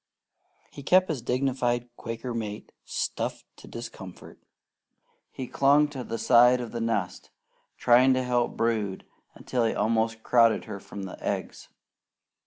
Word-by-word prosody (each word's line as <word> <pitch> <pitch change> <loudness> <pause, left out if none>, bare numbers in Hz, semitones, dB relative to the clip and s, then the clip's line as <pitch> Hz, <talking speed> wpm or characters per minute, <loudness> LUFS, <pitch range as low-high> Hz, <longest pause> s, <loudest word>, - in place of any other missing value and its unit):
He 140 - -10
kept 185 +6 +4
his 150 -6 -2
dignified 125 -1 0
Quaker 115 +2 -6
mate 105 -2 -5
stuffed - - -3
to - - -14
discomfort; 95 -6 -10 0.9
he 130 - -6
clung 140 +4 +3
to 135 -3 -6
the 115 - -4
side 125 +1 +5
of 120 -2 -6
the 115 - -4
nest 105 -6 -2 0.5
trying 125 +2 +5
to 130 - 0
help 125 -1 0
brood 110 -4 -1 0.3
until 125 -2 -2
he 115 - 0
almost 110 +1 0
crowded 115 -2 +3
her 100 - -7
from 100 0 -9
the 95 - -9
eggs. - - -4
120 Hz, 140 wpm, -27 LUFS, 110-125 Hz, 0.9 s, side